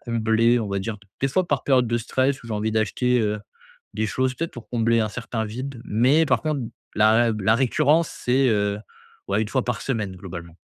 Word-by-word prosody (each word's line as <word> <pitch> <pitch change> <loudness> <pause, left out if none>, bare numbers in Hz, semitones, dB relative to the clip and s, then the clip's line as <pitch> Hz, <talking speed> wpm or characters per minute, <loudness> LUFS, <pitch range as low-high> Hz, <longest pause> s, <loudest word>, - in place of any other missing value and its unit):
combler 115 0 +2
on 105 - -3
va 100 0 -1
dire. 110 +2 -4
D 100 - -22 0.2
des 135 - +3
fois 185 +7 +1
par - - 0
période 130 -3 +3
de 120 +1 +1
stress 130 +3 0
où - - -12
j'ai 115 - -5
envie 105 +1 -1
d'acheter, 125 +3 +1
heu, 105 -1 -1 0.5
des 110 0 0
choses, 130 +3 0
peut-être 165 +3 -4
pour 120 - -11
combler 115 -1 +2
un 110 - 0
certain 115 0 -4
vide, 125 +3 -6
mais 130 +9 +3
par - - +2
contre 155 -4 -1 0.3
la 110 +1 +5
rab 110 -3 0
la 110 +3 +4
récurrence 145 +5 +2
c'est, 130 +2 +1
heu, 105 -2 +1 0.5
ouais, 100 +2 +1
1 110 - -4
fois 130 +2 0
par 125 -4 -2
semaine, 110 -7 -2
globalement. 85 -3 -9
115 Hz, 220 wpm, -23 LUFS, 105-130 Hz, 0.5 s, la